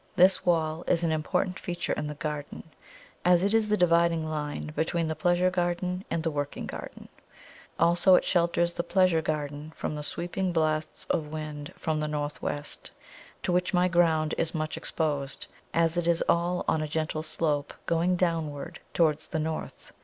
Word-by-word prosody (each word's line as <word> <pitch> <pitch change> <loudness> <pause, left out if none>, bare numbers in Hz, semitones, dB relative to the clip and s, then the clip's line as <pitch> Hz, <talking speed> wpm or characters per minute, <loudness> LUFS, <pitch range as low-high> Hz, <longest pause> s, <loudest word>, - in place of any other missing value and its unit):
This 185 0 +5
wall 160 -1 +1
is 170 0 +2
an 165 - +2
important 180 +4 0
feature 175 -1 -2
in 150 - -3
the 150 - -5
garden, 150 -1 -5 0.6
as 180 0 +5
it 200 +2 +2
is 220 -1 +3
the 210 - +3
dividing 170 -2 +3
line 150 -1 -3
between 165 +1 0
the 160 - -2
pleasure 175 +1 +2
garden 180 +1 -1
and 165 - -1
the 165 - 0
working 145 -1 -3
garden; - - -8 0.7
also, 175 +3 +5
it - - +3
shelters 170 -1 +2
the - - -1
pleasure 180 -1 +3
garden 150 -1 -3
from - - -3
the 150 - -4
sweeping 175 +4 -2
blasts 155 -2 -1
of 155 - 0
wind 150 -1 -6
from 155 -1 -1
the 150 - -1
north 150 -1 -3
west, 145 0 -4 0.5
to - - 0
which 180 +1 +1
my 180 +1 +4
ground 165 -3 +3
is 165 +1 -1
much 155 0 -2
exposed, 145 -4 -2 0.3
as 165 0 +2
it 175 -1 0
is 170 -1 +3
all 175 +1 +1
on 160 - +2
a 155 - -2
gentle 155 0 -2
slope, 155 -2 -1
going 170 +2 +2
downward 165 -5 -2 0.2
towards 155 -2 +2
the 160 - -3
north. 155 0 -4
165 Hz, 175 wpm, -28 LUFS, 155-175 Hz, 0.7 s, This